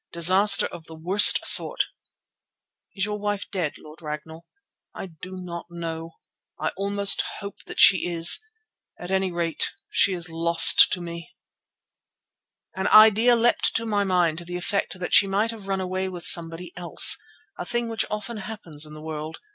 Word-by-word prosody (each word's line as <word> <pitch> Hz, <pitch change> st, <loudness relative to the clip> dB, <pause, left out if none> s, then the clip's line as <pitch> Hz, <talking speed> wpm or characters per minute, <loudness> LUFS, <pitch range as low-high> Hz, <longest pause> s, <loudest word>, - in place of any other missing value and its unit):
"Disaster 185 Hz, +5 st, +4 dB
of 160 Hz, -, -10 dB
the 160 Hz, -, -12 dB
worst 180 Hz, +6 st, +4 dB
sort." -, -, +5 dB, 1.1 s
"Is 190 Hz, -1 st, -2 dB
your 210 Hz, 0 st, -5 dB
wife 205 Hz, -1 st, -4 dB
dead, 180 Hz, -7 st, -3 dB
Lord 155 Hz, +2 st, -16 dB
Ragnall?" 160 Hz, +2 st, -9 dB, 0.5 s
"I -, -, -7 dB
do 180 Hz, +2 st, -11 dB
not 170 Hz, -2 st, -9 dB
know. 165 Hz, -1 st, -8 dB, 0.5 s
I -, -, -2 dB
almost 200 Hz, 0 st, 0 dB, 0.2 s
hope 200 Hz, 0 st, -10 dB
that -, -, -9 dB
she 185 Hz, -2 st, +5 dB
is. 170 Hz, -, +3 dB, 0.6 s
At 175 Hz, +1 st, -8 dB
any 190 Hz, -1 st, -1 dB
rate 170 Hz, -2 st, -2 dB, 0.2 s
she 195 Hz, -, +1 dB
is 175 Hz, -1 st, -2 dB
lost 165 Hz, 0 st, +4 dB
to 180 Hz, -, -4 dB
me." 170 Hz, -1 st, -10 dB, 1.4 s
An 190 Hz, 0 st, -3 dB
idea 220 Hz, +3 st, +5 dB
leapt 235 Hz, +1 st, 0 dB
to 230 Hz, -, -1 dB
my 205 Hz, -2 st, -1 dB
mind 175 Hz, -4 st, 0 dB
to 170 Hz, -, -12 dB
the 175 Hz, +1 st, -6 dB
effect 185 Hz, +1 st, -4 dB
that 175 Hz, -, -6 dB
she 200 Hz, -, +5 dB
might 205 Hz, +4 st, -1 dB
have 215 Hz, -4 st, -12 dB
run 195 Hz, -1 st, -2 dB
away 185 Hz, 0 st, -4 dB
with 175 Hz, -2 st, -9 dB
somebody 170 Hz, +1 st, +1 dB
else, 175 Hz, -1 st, +4 dB, 0.4 s
a -, -, -4 dB
thing 240 Hz, -1 st, -3 dB
which 225 Hz, -1 st, -2 dB
often 215 Hz, +2 st, -6 dB
happens 185 Hz, -8 st, -6 dB
in 150 Hz, -, -13 dB
the 155 Hz, -, -12 dB
world. 155 Hz, 0 st, -7 dB
180 Hz, 170 wpm, -23 LUFS, 165-200 Hz, 1.4 s, sort